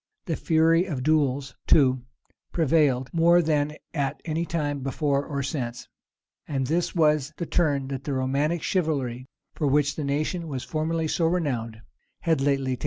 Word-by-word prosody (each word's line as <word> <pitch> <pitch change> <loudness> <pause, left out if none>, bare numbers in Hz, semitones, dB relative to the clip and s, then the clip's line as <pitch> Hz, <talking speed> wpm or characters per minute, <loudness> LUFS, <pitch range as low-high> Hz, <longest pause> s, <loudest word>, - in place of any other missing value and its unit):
The 165 - -1
fury 165 +3 +3
of 145 -9 -4
duels, 140 -3 +1
too, 130 -3 +4 0.5
prevailed 145 -6 +2
more 170 +1 +5
than 150 -3 +1 0.2
at 140 -3 -1
anytime 155 -3 -2
before 140 +1 0
or 140 -1 -3
since.[] 125 -4 -4 0.6
This 155 +6 -1
was 150 -3 +2
the 170 - -3
turn 145 -6 +1
that 135 -1 -5
the 145 - -2
romantic 140 +5 0
chivalry, 135 -8 -1 0.3
for 150 - -1
which 145 +1 +2
the 155 - -3
nation 155 +5 -1
was 135 -4 -4
formerly 160 +1 -1
so 165 +1 +1
renowned, 125 -10 -2 0.4
had 160 -4 +1
lately 135 -2 +1
taken. - - -26
145 Hz, 150 wpm, -25 LUFS, 135-160 Hz, 0.6 s, more